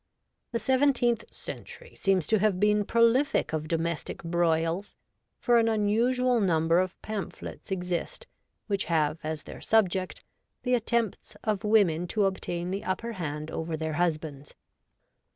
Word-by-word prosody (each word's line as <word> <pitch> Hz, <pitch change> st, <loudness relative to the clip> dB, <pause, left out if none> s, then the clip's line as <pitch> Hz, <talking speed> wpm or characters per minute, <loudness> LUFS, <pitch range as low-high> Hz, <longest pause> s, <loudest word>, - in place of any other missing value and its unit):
The 235 Hz, -, 0 dB
seventeenth 250 Hz, -3 st, +2 dB
century -, -, -9 dB
seems 190 Hz, -5 st, +1 dB
to 220 Hz, -, +2 dB
have 200 Hz, -3 st, +2 dB
been 210 Hz, 0 st, +3 dB
prolific 235 Hz, -, +3 dB
of 155 Hz, 0 st, -2 dB
domestic 165 Hz, 0 st, -2 dB
broils, 165 Hz, +2 st, 0 dB, 0.4 s
for 240 Hz, -2 st, +4 dB
an 230 Hz, -, +3 dB
unusual 235 Hz, +4 st, +2 dB
number 165 Hz, -3 st, +3 dB
of 185 Hz, 0 st, -2 dB
pamphlets 215 Hz, -3 st, -6 dB
exist 180 Hz, -, -3 dB, 0.4 s
which 200 Hz, -2 st, 0 dB
have 155 Hz, -1 st, +1 dB
as 155 Hz, -1 st, -4 dB
their -, -, -10 dB
subject 190 Hz, -4 st, +1 dB, 0.4 s
the 250 Hz, -, +1 dB
attempts 235 Hz, -3 st, -1 dB
of 210 Hz, -3 st, -1 dB
women 190 Hz, -6 st, +3 dB
to 210 Hz, +2 st, +1 dB
obtain 180 Hz, -2 st, -2 dB
the 195 Hz, +1 st, -3 dB
upper 230 Hz, +5 st, -2 dB
hand 155 Hz, -5 st, -4 dB
over 160 Hz, 0 st, -3 dB
their 160 Hz, 0 st, -3 dB
husbands. 155 Hz, -4 st, -2 dB
190 Hz, 135 wpm, -28 LUFS, 165-225 Hz, 0.4 s, for